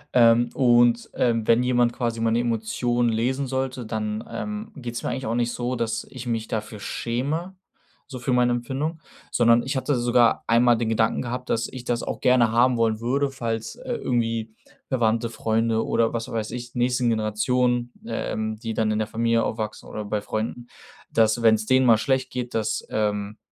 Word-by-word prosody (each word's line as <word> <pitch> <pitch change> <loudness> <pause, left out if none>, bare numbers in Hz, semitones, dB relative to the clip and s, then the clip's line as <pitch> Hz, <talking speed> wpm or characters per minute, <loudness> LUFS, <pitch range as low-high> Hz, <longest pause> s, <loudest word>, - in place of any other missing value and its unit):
Ähm, 120 0 +5
und, 120 -2 +4
ähm, 115 -3 +1
wenn 115 +2 +4
jemand 120 -1 +2
quasi 115 -3 -2
meine 115 +1 +2
Emotionen 120 +1 0
lesen 130 +5 0
sollte, 130 -2 -3
dann, 110 0 -3
ähm, 210 +1 -5
geht's 120 -4 -5
mir - - -2
eigentlich 130 - -3
auch 110 - -1
nicht 120 0 0
so, 125 +1 -2
dass 115 -2 -2
ich 125 -2 -8
mich 115 -2 -2
dafür 105 -1 -4
schäme, 145 - -3 0.5
so 130 -3 -8
für 125 +1 -1
meine 125 0 +3
Empfindung, 135 +7 -2 0.3
sondern 120 0 +4
ich 135 +3 -3
hatte 135 +1 0
sogar 120 -1 +3
einmal 120 +1 +4
den 115 -1 -1
Gedanken 115 +2 +1
gehabt, 125 +1 -5
dass 115 0 0
ich 130 -2 -9
das 120 -1 -1
auch - - -4
gerne 125 -3 +4
haben 120 +2 +3
wollen 110 -1 +1
würde, 135 +4 0
falls, 115 - -4
äh, 250 0 -5
irgendwie 115 -2 -1 0.3
Verwandte, 115 -2 +1
Freunde 115 0 0
oder 115 -1 +1
was 115 -1 -3
weiß 110 -1 -3
ich, 120 0 -7
nächsten 125 0 +1
Generationen, 120 +3 +1
ähm, 110 - -3
die 115 -1 -5
dann 110 -1 +1
in 110 - 0
der 110 - -1
Familie 115 +1 +1
aufwachsen 110 -1 -4
oder 105 -1 -5
bei 105 0 -2
Freunden, 115 +3 -4 0.4
dass 110 +1 +2
wenn's 110 -1 +4
denen 130 +1 +4
mal 115 -2 +7
schlecht 130 +1 0
geht, 125 -1 -5
dass, 110 0 -1
ähm, 105 -1 -1
120 Hz, 185 wpm, -24 LUFS, 110-125 Hz, 0.5 s, mal